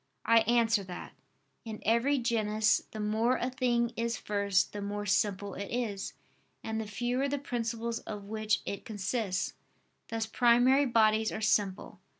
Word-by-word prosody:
I 230 0 +6
answer 230 -3 +3
that, 180 -1 -8 0.5
In 220 -2 -7
every 235 +6 +3
genus, 220 -3 +2
the 215 - -8
more 220 +4 +1
a 250 - -2
thing 240 -2 +1
is 230 0 -1
first, 200 -2 0
the 205 - -5
more 205 +1 -3
simple 200 0 0
it 200 +1 -6
is, 220 -5 -3 0.5
and 220 0 -2
the 215 - -6
fewer 245 +6 -1
the 285 - -1
principles 235 -3 -3
of 210 -2 -7
which 215 0 -1
it 200 - -5
consists: 205 -3 -2 0.5
thus 225 -1 -2
primary 245 +4 +4
bodies 220 -2 +3
are - - -4
simple. 205 -2 0
220 Hz, 155 wpm, -30 LUFS, 205-235 Hz, 0.5 s, I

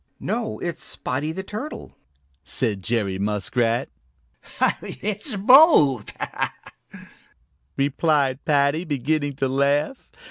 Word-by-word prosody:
"No, 110 - -3
it's 170 +6 -5
Spotty 135 +5 -3
the 190 +4 -5
Turtle," 215 +10 -7 0.5
said 105 -6 -1
Jerry 100 -3 -1
Muskrat. 115 +4 0 0.9
"It's 210 +5 -4
both," 200 - +5 1.6
replied 140 -1 +1
Paddy, 145 +2 +2
beginning 145 -1 -1
to 135 0 0
laugh. 140 - 0
140 Hz, 85 wpm, -23 LUFS, 125-170 Hz, 1.6 s, both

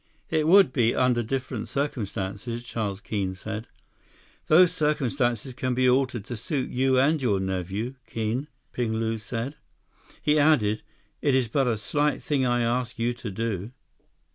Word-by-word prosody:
"It 155 -1 +2
would 190 -5 +6
be, 120 -3 +2
under 125 -2 +3
different 125 -1 -3
circumstances," 115 -4 -3
Charles 105 -4 -3
Keene 95 -4 -2
said. 110 +4 -6 0.8
"Those 175 +3 +6
circumstances 135 -5 0
can 130 0 -2
be 130 0 +3
altered 125 -4 +2
to 120 - -5
suit 130 +4 -2
you 130 +1 +2
and 145 +4 +3
your 105 -7 +2
nephew, 95 +5 -2
Keene," 115 +5 -2 0.2
Ping 120 -3 -1
Lu 110 0 -1
said. 115 +6 -4 0.6
He 150 0 +2
added, 125 -9 +3 0.4
"It 140 -3 +3
is 130 -3 +2
but 135 +2 +1
a 115 -3 +1
slight 145 +7 0
thing 140 -4 +1
I 120 0 +2
ask 120 0 -1
you 120 +1 0
to 120 -2 -7
do." 110 +1 -3
120 Hz, 155 wpm, -26 LUFS, 110-135 Hz, 0.8 s, would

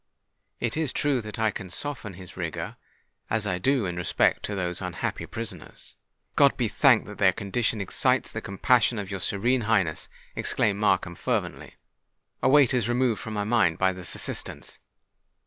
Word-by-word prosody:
It 120 -2 -1
is 155 -4 0
true 140 -4 +1
that 105 -1 -7
I 110 -1 +2
can 95 -2 -7
soften 120 -2 -5
his 90 -1 -11
rigour—as 90 +5 -5
I 100 - 0
shall 90 - -2
do 130 +1 +2
in 90 -1 -3
respect 90 - +2
to 105 - -3
those 90 -1 -2
unhappy 90 -2 -3
prisoners——" - - -8 0.4
"God - - +5
be - - +1
thanked - - +4
that - - -10
their - - +6
condition 110 +2 -1
excites 100 - +1
the - - -4
compassion 115 +4 +2
of 100 -1 -5
your 95 - -3
Serene 120 +8 +1
Highness!" 100 -8 0 0.3
exclaimed 100 -1 0
Markham 95 -4 +2
fervently. - - -3 0.7
"A - - +3
weight 140 -2 +6
is 120 -3 +1
removed 120 -2 +1
from 110 -1 -5
my 105 - 0
mind 105 -7 +2
by 95 0 +2
this 90 -1 -7
assurance!" - - -6
105 Hz, 170 wpm, -26 LUFS, 95-120 Hz, 0.7 s, their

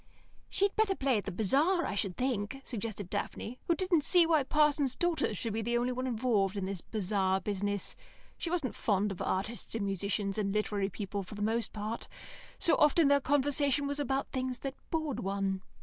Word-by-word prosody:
"She'd 400 +1 +1
better 435 -3 +2
play 265 -7 +2
at 205 - -8
the 200 - -3
bazaar, 285 - +2
I - - -2
should 195 -2 -1
think," 250 -1 -1
suggested 215 -5 -4
Daphne, 235 +6 -4
who 340 - +3
didn't 355 -4 +2
see 350 +2 +5
why 320 -2 +4
parsons' 290 -1 +2
daughters 335 - 0
should 225 +1 -2
be 225 - -1
the 240 +2 0
only 245 +1 0
ones 255 +1 -2
involved 215 -5 +1
in 195 - -1
this 190 -2 -4
bazaar 190 -2 0
business. 205 0 -2 0.4
She 335 - -3
wasn't 325 -8 -1
very - - -14
fond 205 -1 +2
of 190 - -6
artists 205 +3 -2
and 215 -3 -1
musicians 200 +1 -1
and 200 -2 0
literary 205 -1 0
people, 200 0 -4
for 195 +2 -9
the 205 - -3
most 225 +1 0
part; 215 +2 -4 0.5
so 335 - +3
often 300 0 +5
their 280 0 +5
conversation 285 0 +2
was 285 +1 -2
about 270 -1 -1
things 255 -1 -2
that 275 -1 -3 0.2
bored 315 -4 -1
one. 195 -1 -1
230 Hz, 195 wpm, -31 LUFS, 200-285 Hz, 0.5 s, see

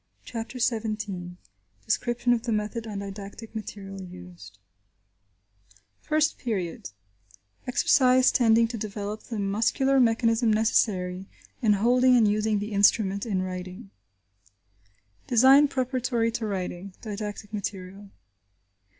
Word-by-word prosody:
CHAPTER 230 +2 -6
XVII 210 -7 -2 0.5
DESCRIPTION 240 +2 +1
OF 235 - 0
THE 235 0 -3
METHOD 215 +2 -2
AND 205 -2 -5
DIDACTIC 200 +3 -9
MATERIAL 195 -3 -7
USED 90 - -12 1.4
FIRST 310 0 0
PERIOD: 190 -9 -4 0.8
EXERCISE 255 0 +4
TENDING 230 -1 +4
TO 230 -1 -6
DEVELOP 210 0 -5
THE 230 - -6
MUSCULAR 230 +7 +1
MECHANISM 230 -1 +2
NECESSARY 195 -4 +1 0.3
IN 215 -4 +4
HOLDING 250 +4 +4
AND 225 -3 +4
USING 210 +1 +1
THE 205 +2 -4
INSTRUMENT 200 +1 +2
IN 190 -4 -1
WRITING 185 +3 -7 1.4
Design 265 +4 +6
Preparatory 255 -3 -1
to 225 -1 -3
Writing.–Didactic 200 +3 -6
Material. 195 -1 -6
215 Hz, 105 wpm, -26 LUFS, 195-235 Hz, 1.4 s, Design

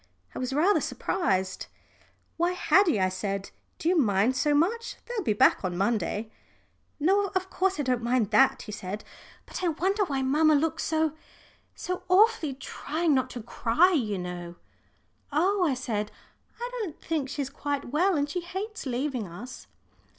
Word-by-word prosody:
I - - -6
was 255 0 -2
rather 335 +9 +3
surprised. 190 - -1 0.7
"Why, 345 +2 +1
Haddie," 360 - +3
I 185 0 +2
said, 195 +1 -4 0.3
"do 325 - -3
you 360 - +4
mind 225 - +3
so 295 +2 +2
much? 440 +10 +1
They'll 480 -3 -3
be 215 - +2
back 205 - +4
on 180 -2 -2
Monday." 215 +1 -1 0.7
"No, 390 +6 +3
of 375 0 -1
course 385 -2 0
I - - +1
don't 250 -2 0
mind 235 -3 +1
that," 265 +5 +4
he 210 - -8
said. 205 0 -5 0.4
"But - - -6
I - - +2
wonder 380 +6 +1
why 275 -5 -1
mamma 305 +3 +4
looks 325 +2 0
so 315 -1 +1 0.6
so 365 0 -4
awfully 375 - +4
trying 310 +4 -1
not 260 -1 +1
to 245 -3 -7
cry, 240 - +3
you 225 - 0
know." 175 -1 -6 0.8
"Oh," 365 +6 +2
I 295 -6 +2
said, 215 -4 -3 0.5
"I 480 - -3
don't 345 -8 -5
think 305 -5 -2
she's 280 -1 -3
quite 285 -3 -3
well. 360 +6 +3
And 285 0 +1
she 355 +5 -3
hates 380 +1 -5
leaving 250 -3 -2
us." 205 +10 -9
285 Hz, 165 wpm, -27 LUFS, 225-355 Hz, 0.8 s, you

